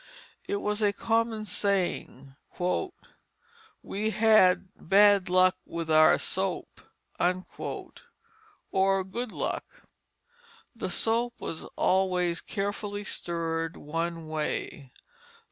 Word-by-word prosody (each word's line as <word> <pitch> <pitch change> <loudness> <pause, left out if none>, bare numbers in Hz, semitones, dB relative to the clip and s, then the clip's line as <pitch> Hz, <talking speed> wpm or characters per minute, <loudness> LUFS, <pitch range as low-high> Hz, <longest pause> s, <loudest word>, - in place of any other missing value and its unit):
It - - -1
was 210 +1 -2
a 205 -1 +4
common 225 0 0
saying: 180 -9 -2 1.5
"We 215 +2 -2
had 215 -4 +4
bad 200 +1 +5
luck 185 0 +4
with 165 -1 -4
our 155 0 +6
soap," - - -3 0.4
or 195 - -3
good 225 +5 -4
luck. - - -3 1.1
The - - -4
soap 235 +2 0
was 160 - -5
always 180 -2 +1
carefully 205 0 -4
stirred 165 -3 -3
one 165 +2 -4
way. 150 -3 -3
190 Hz, 90 wpm, -28 LUFS, 170-215 Hz, 1.5 s, our